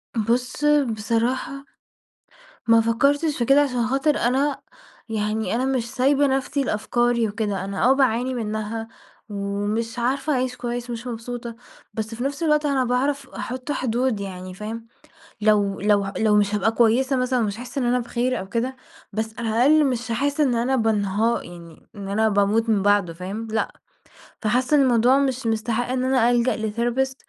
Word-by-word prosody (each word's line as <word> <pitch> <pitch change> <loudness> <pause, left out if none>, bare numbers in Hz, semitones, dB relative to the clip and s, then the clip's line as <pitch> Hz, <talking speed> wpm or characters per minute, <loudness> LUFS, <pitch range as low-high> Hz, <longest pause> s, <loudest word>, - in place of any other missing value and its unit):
بُص 240 +6 -1
بصراحة، 255 0 0 1.0
ما 230 0 +6
فكرتش 280 +7 +1
في 240 - 0
كده 275 +3 +5
عشان 250 -5 0
خاطر 275 +3 +1
أنا 270 +4 0 0.5
يعني 215 +1 -1
أنا 250 +2 0
مش 255 -3 -1
سايبة 275 +2 +2
نفسي 270 +1 0
لأفكاري 240 0 +1
وكده، 205 -3 -3
أنا 195 +2 -3
آه 260 - +6
باعاني 255 -1 +1
منها 220 -1 -3 0.4
ومش 205 +3 -3
عارفة 275 +5 0
أعيش 255 -1 -1
كويس 245 0 -4
ومش 235 +1 -5
مبسوطة، 235 0 -6 0.4
بس 220 +1 -4
في 240 - -4
نفس 280 +3 -3
الوقت 300 -1 +2
أنا 275 -3 +2
باعرف 270 +3 -1
أحط 255 +3 -5
حدود 250 -3 0
يعني، 185 -2 -7
فاهم. 225 +4 -7 0.5
لو 205 -2 +2
لو 205 0 +3
ه 195 0 -5
لو 215 -1 +3
مش 205 0 +2
هابقى 210 +2 +2
كويسة 245 +4 +2
مثلًا 255 0 +1
ومش 210 -2 -1
هاحس 250 +3 -8
إن 270 - +1
أنا 245 +1 +2
بخير 245 +1 -1
أو 190 +1 -7
كده 245 +4 -2 0.4
بس 220 +1 -3
على 230 -1 -2
الأقل 285 +7 +4
مش 240 -3 -2
هاحس 285 +5 -1
إن 270 -5 +3
أنا 245 +3 +1
بانها 220 -1 +1
يعني 170 -2 -13
إن 200 -1 -7
أنا 220 +2 +2
باموت 210 +3 +2
من 210 -3 +3
بعده، 205 -3 +2
فاهم، 195 +6 -6
لأ، 220 - -1 0.7
فحاسة 250 +6 +2
إن - - +5
الموضوع 250 0 +4
مش 265 -3 -1
مستحق 225 +2 -1
إن 255 0 -1
أنا 255 -2 +3
ألجأ 240 +1 +1
لTherapist 240 +4 -1
235 Hz, 165 wpm, -23 LUFS, 215-260 Hz, 1.0 s, ما